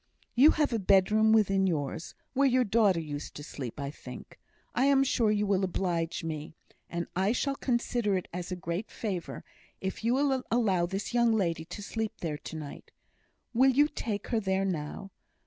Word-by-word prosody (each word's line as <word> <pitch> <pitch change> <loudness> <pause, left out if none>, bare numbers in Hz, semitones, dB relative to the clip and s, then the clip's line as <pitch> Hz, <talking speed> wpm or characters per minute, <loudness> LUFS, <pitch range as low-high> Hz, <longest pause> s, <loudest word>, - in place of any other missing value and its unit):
"You 270 +6 +7
have 295 -5 +2
a 230 - +1
bedroom 210 +3 +4
within 195 -3 +4
yours, 160 -1 -3 0.2
where 275 +1 +4
your 255 -1 +3
daughter 210 -5 +3
used 145 -2 -6
to 145 - -7
sleep, 135 -3 -7
I 140 0 -3
think? - - -11 0.3
I 255 - +2
am 275 -1 +5
sure 240 -4 +2
you 210 0 +2
will 195 -1 +1
oblige 175 -3 -1
me, 155 -1 -5 0.3
and 170 0 -3
I 190 +4 +2
shall 275 +3 0
consider 235 -5 0
it 180 - -5
as 180 +1 -5
a - - -1
great 175 +4 -4
favour, 190 -6 -4 0.4
if 190 +3 -4
you 235 +2 +2
will 270 -1 +2
allow 195 -7 +2
this 195 +5 -4
young 235 -1 +4
lady 170 -6 0
to 205 - -8
sleep 220 +1 -3
there 150 -3 -3
to - - -8
night. 150 -2 -8 0.6
Will 260 +3 +5
you 285 +3 +4
take 215 -9 -4
her 230 - +2
there 190 -1 0
now? 180 +2 -4
195 Hz, 185 wpm, -29 LUFS, 170-235 Hz, 0.6 s, You